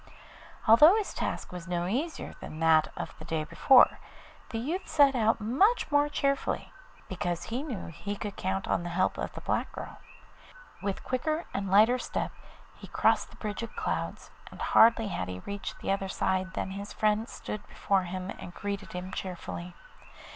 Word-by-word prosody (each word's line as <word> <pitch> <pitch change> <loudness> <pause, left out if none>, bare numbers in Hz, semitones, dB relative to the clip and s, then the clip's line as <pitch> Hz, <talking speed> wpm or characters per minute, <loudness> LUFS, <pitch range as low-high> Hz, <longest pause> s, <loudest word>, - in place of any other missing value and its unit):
Although 300 - +9
his 435 -2 -1
task - - -3
was 180 -1 -7
no 175 -1 -1
easier 275 - -2
than 155 - -8
that 160 -1 +5
of - - -5
the - - -9
day 160 -1 -1
before, 255 - +5 0.5
the 225 - -4
youth 310 +11 -3
set 285 -2 +5
out 225 -3 +2
much 295 - +2
more 290 0 +4
cheerfully, 275 -1 -1 0.3
because 175 -2 -2
he 240 +4 -3
knew 255 - -5
he 200 +5 -5
could 205 0 -5
count 190 +1 -2
an - - 0
the 175 - -5
help 170 - 0
of - - -3
the - - -8
black - - 0
girl. - - -8 0.8
With 195 -1 -3
quicker 310 +6 -1
and 195 -1 -2
lighter 220 +6 +5
step - - -3 0.4
he - - -12
crossed - - +2
the - - -16
bridge 210 0 -4
of 230 - -7
clouds, - - -3 0.2
and - - -13
hardly 225 -1 +5
had 90 - -3
he 90 0 -6
reached 200 0 -6
the - - -1
other 195 -1 -1
side 185 0 -1
than 190 - -2
his 200 +1 -6
friend 215 +1 +1
stood 210 -1 -7
before 195 -2 0
him 185 +2 -5
and 175 - -9
greeted 200 -1 -5
him 180 +1 -5
cheerfully. 180 -1 -6
200 Hz, 180 wpm, -29 LUFS, 185-245 Hz, 0.8 s, Although